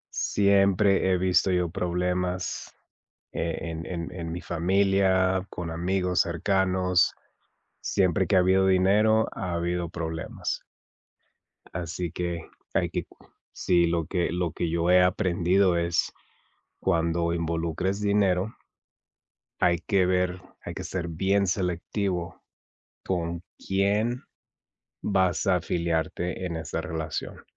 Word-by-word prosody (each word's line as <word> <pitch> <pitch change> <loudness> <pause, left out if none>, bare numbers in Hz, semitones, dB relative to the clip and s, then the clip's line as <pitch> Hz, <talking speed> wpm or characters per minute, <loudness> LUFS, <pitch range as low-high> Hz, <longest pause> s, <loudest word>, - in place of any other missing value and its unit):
Siempre 100 -1 +3
he 90 - +3
visto 95 +1 +3
yo 90 -1 +1
problemas, 90 +1 -2 0.6
eh, 85 -1 -2
en 85 -1 -5
en 85 -2 -4
en 85 -2 -5
mi 90 - -4
familia, 95 +1 +2
con 85 -1 -5
amigos 90 +2 0
cercanos. 90 +1 +1 0.7
Siempre 95 -1 +1
que 95 +3 +2
ha - - +7
habido 95 +1 +4
dinero, 105 +4 +4
ha 90 -2 -4
habido 85 0 -1
problemas. 80 -1 -4 1.1
Así 85 0 -4
que 85 -2 -4 0.3
hay - - +2
que - - -3 0.5
Sí, 85 -2 +2
lo 85 -2 0
que 90 -3 0
lo 85 -1 -1
que 85 +1 -2
yo 85 +1 0
he 90 0 +7
aprendido 90 +1 +2
es 85 -1 0 0.7
cuando 85 -1 +1
involucres 85 +3 -1
dinero 100 -1 +1 1.1
hay 85 -1 +3
que 95 -3 +2
ver 90 0 0 0.2
hay - - -6
que - - -6
ser 85 -2 -3
bien 95 +4 +1
selectivo 90 -1 -2 0.6
con 85 -2 -2 0.2
quién 105 +5 0 0.8
vas 95 -1 +1
a 95 -2 +4
afiliarte 85 +1 -2
en 85 - -3
esa 80 - -4
relación. 80 -1 -5
90 Hz, 120 wpm, -26 LUFS, 85-95 Hz, 1.1 s, ha